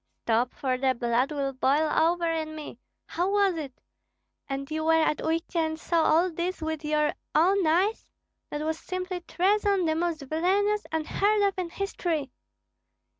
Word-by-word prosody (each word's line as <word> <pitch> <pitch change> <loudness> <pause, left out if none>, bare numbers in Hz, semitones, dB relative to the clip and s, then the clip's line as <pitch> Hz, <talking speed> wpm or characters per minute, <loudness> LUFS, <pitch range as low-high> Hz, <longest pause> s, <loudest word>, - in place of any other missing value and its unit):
"Stop, 235 +2 +1
for 255 -2 -1
the 260 -1 +2
blood 240 +3 +1
will 280 -2 -2
boil 275 +4 +2
over 340 +2 +2
in 320 -1 -2
me! 295 -6 -8 0.3
How 355 +3 -1
was 400 -2 +2
it? 285 -5 -7 0.7
And 275 +2 -4
you 315 0 -2
were 325 +1 +3
at 315 -1 +1
Uistsie 330 +2 -2
and 315 0 -1
saw 335 0 +1
all 340 +4 +3
this 350 +3 -3
with 315 -1 -3
your 300 0 +1 0.2
own 365 +3 +4
eyes? 375 +8 +1 0.4
That 295 - -4
was 320 0 -2
simply 370 0 -4
treason 395 +1 +1
the 315 - +2
most 325 -2 -1
villanous, 390 +8 +1
unheard 400 +7 +1
of 400 -1 +2
in 355 -2 -2
history." 335 -7 -3
320 Hz, 165 wpm, -27 LUFS, 300-365 Hz, 0.7 s, own